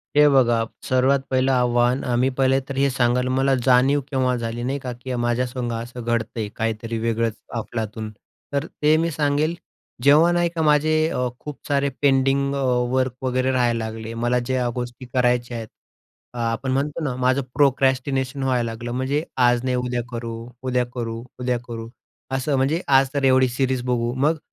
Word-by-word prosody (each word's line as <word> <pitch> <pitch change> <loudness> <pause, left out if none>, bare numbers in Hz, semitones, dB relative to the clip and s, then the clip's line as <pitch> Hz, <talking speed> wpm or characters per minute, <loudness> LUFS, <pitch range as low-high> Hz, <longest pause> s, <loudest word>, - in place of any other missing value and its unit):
हे 150 0 +7
बघा 120 -4 +4 0.3
सर्वात 130 +2 +3
पहिलं 130 0 +2
आव्हान, 125 0 +2
अ, 125 - -1
मी 125 +2 +2
पहिले 135 0 +3
तर 140 - -4
हे 140 0 +3
सांगाल 125 -1 +1
मला 135 +1 +2
जाणीव 135 +3 +4
केव्हा 130 -1 +1
झाली 115 0 -4
नाही 135 +3 -2
का, 130 -1 -5
की 125 +1 -6
माझ्या 120 +1 +1
संग 125 -1 -4
असं 120 +2 -6
घडतंय 115 -2 -2
काहीतरी 115 +1 -2
वेगळंच 115 0 0 0.3
अफलातून. 110 -1 -5 0.4
तर 140 +2 0
ते 150 -1 +1
मी 165 +1 0
सांगेल, 150 +3 0 0.5
जेव्हा 150 +5 +6
नाही 175 0 +2
का 160 - 0
माझे 150 0 +3 0.2
अ, 125 -4 -1
खूप 150 -2 -8
सारे 140 -1 +1
पेंडिंग 140 0 +2
अ, - - -2 0.3
वर्क 130 -1 +1
वगैरे 130 0 +1
राहायला 120 -3 +1
लागले. 110 0 -6
मला 120 +2 +1
ज्या 125 0 -1
गोष्टी 125 +1 -5
करायच्या 125 -1 +1
आहेत, 110 -1 -6 0.7
अ, 125 - -9
आपण 130 +3 -3
म्हणतो 145 +4 -1
ना 135 -4 -2
माझं 130 +2 +1
प्रोक्रॅस्टिनेशन 135 -1 +1
व्हायला 125 -3 0
लागलं 120 +1 -6
म्हणजे 130 +5 -1 0.2
आज 120 0 +2
नाही 130 -1 0
उद्या 125 -1 -1
करू, 115 -1 -5 0.3
उद्या 125 -1 +1
करू, 115 -2 -4 0.2
उद्या 125 -1 0
करू 115 -1 -6 0.4
असं. 135 +2 0
म्हणजे 145 +7 +1
आज 135 -1 +4
तर 140 -1 -1
एवढी 130 0 +5
सीरीज 130 0 0
बघू. 120 -1 0
मग 155 +4 +2
130 Hz, 175 wpm, -22 LUFS, 120-135 Hz, 0.7 s, हे